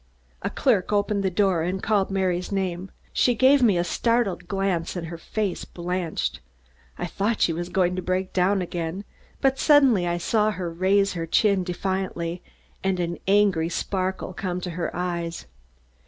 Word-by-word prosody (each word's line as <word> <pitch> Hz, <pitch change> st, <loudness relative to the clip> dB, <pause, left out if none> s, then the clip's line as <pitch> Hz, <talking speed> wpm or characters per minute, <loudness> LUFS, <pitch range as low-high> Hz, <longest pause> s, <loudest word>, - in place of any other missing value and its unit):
A -, -, -1 dB
clerk 215 Hz, -9 st, +1 dB
opened 205 Hz, 0 st, +1 dB
the 190 Hz, -, +1 dB
door 185 Hz, -2 st, +2 dB
and 185 Hz, +3 st, -2 dB
called 205 Hz, -3 st, +2 dB
Mary's 185 Hz, -2 st, -1 dB
name. 190 Hz, -1 st, -2 dB, 0.2 s
She 245 Hz, -, +3 dB
gave 265 Hz, +4 st, +5 dB
me 215 Hz, -7 st, +4 dB
a 175 Hz, -, +2 dB
startled 200 Hz, -1 st, 0 dB
glance 190 Hz, -3 st, -1 dB
and 175 Hz, -2 st, -4 dB
her 170 Hz, -, -6 dB
face 205 Hz, +1 st, -2 dB
blanched. 170 Hz, -, -3 dB, 0.6 s
I -, -, -3 dB
thought 205 Hz, +5 st, -1 dB
she 165 Hz, -, +3 dB
was 175 Hz, +2 st, -4 dB
going 180 Hz, -1 st, +1 dB
to -, -, -1 dB
break 185 Hz, +1 st, -2 dB
down 190 Hz, +1 st, +2 dB
again, 175 Hz, +3 st, -4 dB, 0.4 s
but 270 Hz, -1 st, +2 dB
suddenly 265 Hz, -, +5 dB
I 175 Hz, 0 st, 0 dB
saw 215 Hz, +4 st, +1 dB
her 180 Hz, -5 st, -4 dB
raise 195 Hz, +3 st, +2 dB
her 165 Hz, -2 st, -4 dB
chin 200 Hz, +2 st, +3 dB
defiantly 180 Hz, -1 st, -3 dB, 0.4 s
and 190 Hz, -1 st, 0 dB
an 170 Hz, 0 st, -2 dB
angry 195 Hz, -5 st, +3 dB
sparkle 185 Hz, +1 st, -2 dB
come 180 Hz, -1 st, -3 dB
to 180 Hz, -, -4 dB
her 170 Hz, 0 st, -2 dB
eyes. 170 Hz, -1 st, -3 dB
185 Hz, 170 wpm, -25 LUFS, 175-200 Hz, 0.6 s, gave